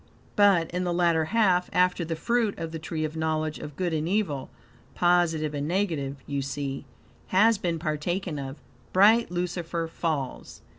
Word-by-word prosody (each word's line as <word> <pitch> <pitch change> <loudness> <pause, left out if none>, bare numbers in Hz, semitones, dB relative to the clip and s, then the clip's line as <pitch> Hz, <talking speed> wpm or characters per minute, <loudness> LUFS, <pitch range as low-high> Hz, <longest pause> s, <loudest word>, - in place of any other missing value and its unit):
But 195 -5 +4
in 180 +1 -1
the 175 -1 -1
latter 170 -2 +3
half, 185 -3 +2
after 180 -1 +2
the 165 0 -3
fruit 230 +4 0
of 165 -1 -5
the 160 - -5
tree 155 0 -3
of 155 +1 -5
knowledge 155 -1 -1
of 150 - -8
good 180 -3 -1
and 155 +1 -1
evil 180 -10 -1 0.5
(positive 170 -4 +2
and 145 0 -2
negative, 155 -8 -1
you 140 -1 -2
see) 135 0 -4 0.4
has 215 +3 +4
been 170 -4 -1
partaken 160 +1 -2
of, 135 0 -5 0.4
bright 215 +5 +5
Lucifer 175 -1 -2
falls. 155 -5 -4
165 Hz, 160 wpm, -27 LUFS, 155-180 Hz, 0.5 s, bright